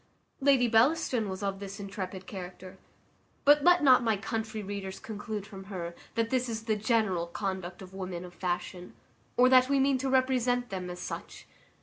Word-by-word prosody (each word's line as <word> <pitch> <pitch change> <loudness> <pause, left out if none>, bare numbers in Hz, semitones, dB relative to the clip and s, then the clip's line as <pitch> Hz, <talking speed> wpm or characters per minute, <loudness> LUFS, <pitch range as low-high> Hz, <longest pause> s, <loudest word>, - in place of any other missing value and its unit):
Lady 270 -3 +4
Bellaston 240 -1 +3
was 190 +1 -5
of 195 -1 -2
this 195 0 -7
intrepid 190 -1 -6
character; 185 -1 -9 0.7
but 290 0 +6
let 355 -1 +5
not 260 -3 +7
my 225 -3 +1
country 220 0 -4
readers 195 -1 -5
conclude 215 -1 -5
from 195 -1 -10
her, 175 -4 -5 0.2
that 230 0 0
this 255 -1 +1
is 225 -1 -4
the 220 -1 +1
general 210 -5 +1
conduct 190 0 -4
of 185 0 -12
women 185 -2 -5
of 175 - -11
fashion, 180 0 -4 0.4
or 250 - +7
that 255 0 +6
we 280 -1 +3
mean 270 -1 +3
to 265 +1 -1
represent 250 -2 +2
them 185 -2 -4
as 180 - -6
such. 180 - -7
210 Hz, 180 wpm, -29 LUFS, 190-250 Hz, 0.7 s, not